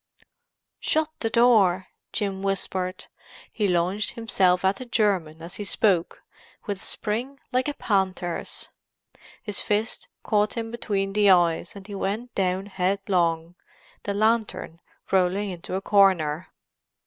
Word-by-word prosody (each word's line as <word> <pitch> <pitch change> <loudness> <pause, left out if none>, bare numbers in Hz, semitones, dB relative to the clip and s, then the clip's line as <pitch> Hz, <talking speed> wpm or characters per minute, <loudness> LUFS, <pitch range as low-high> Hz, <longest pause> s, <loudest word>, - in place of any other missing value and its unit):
"Shut 315 0 +1
the 225 - 0
door!" 215 -6 +4 0.2
Jim 195 -2 -2
whispered. 190 -1 -2 0.5
He 210 -3 +1
launched 180 +3 +1
himself 190 -6 +2
at 190 +1 +3
the 255 - -6
German 190 -9 0
as 170 +2 -7
he 210 - -4
spoke, 190 -3 +1 0.4
with 200 -3 -3
a - - -12
spring 245 +6 -3
like 255 +2 +1
a 295 - -2
panther's. 190 -4 -2 0.7
His 210 -3 -2
fist 215 +2 -1 0.2
caught 210 +1 +1
him 225 -1 -3
between 195 -4 -2
the 205 -1 +4
eyes 175 -1 +3
and 195 -1 -10
he 205 - -8
went 210 +5 -3
down 190 0 0
headlong, 180 -4 0 0.5
the 200 - -3
lantern 215 -6 0 0.3
rolling 190 +2 +2
into 180 +1 -5
a 190 - -1
corner. 185 -6 +3
195 Hz, 135 wpm, -25 LUFS, 180-215 Hz, 0.7 s, door